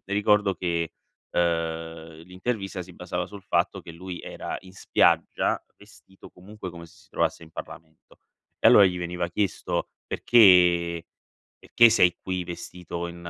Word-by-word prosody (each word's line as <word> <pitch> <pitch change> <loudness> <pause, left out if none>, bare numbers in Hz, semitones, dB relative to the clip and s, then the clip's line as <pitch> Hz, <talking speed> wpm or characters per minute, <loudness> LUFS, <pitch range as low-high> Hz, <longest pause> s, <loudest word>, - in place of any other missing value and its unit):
ricordo 100 0 +2
che, 85 -2 -2 0.4
uhm, 80 -1 -2
l'intervista 95 +1 -4
si 90 +1 -13
basava 90 0 -4
sul 100 -1 -11
fatto 95 +1 0
che 85 - -11
lui 90 +1 -8
era - - -6
in 95 -1 -15
spiaggia, - - +2 0.2
vestito 95 0 -17
comunque 95 +1 -10
come 85 -1 -10
se 80 - -17
si - - -27
trovasse - - -1
in 80 - -18
Parlamento. 80 -1 -12 0.4
E - - +3
allora 100 - +8
gli 90 -1 +1
veniva 85 0 -3
chiesto 100 +2 -2 0.2
perché 90 -6 +4 0.5
perché 120 - +5
sei 90 -5 +4
qui 90 -1 -3
vestito 85 0 -6
in 85 - -9
90 Hz, 145 wpm, -25 LUFS, 85-95 Hz, 0.5 s, allora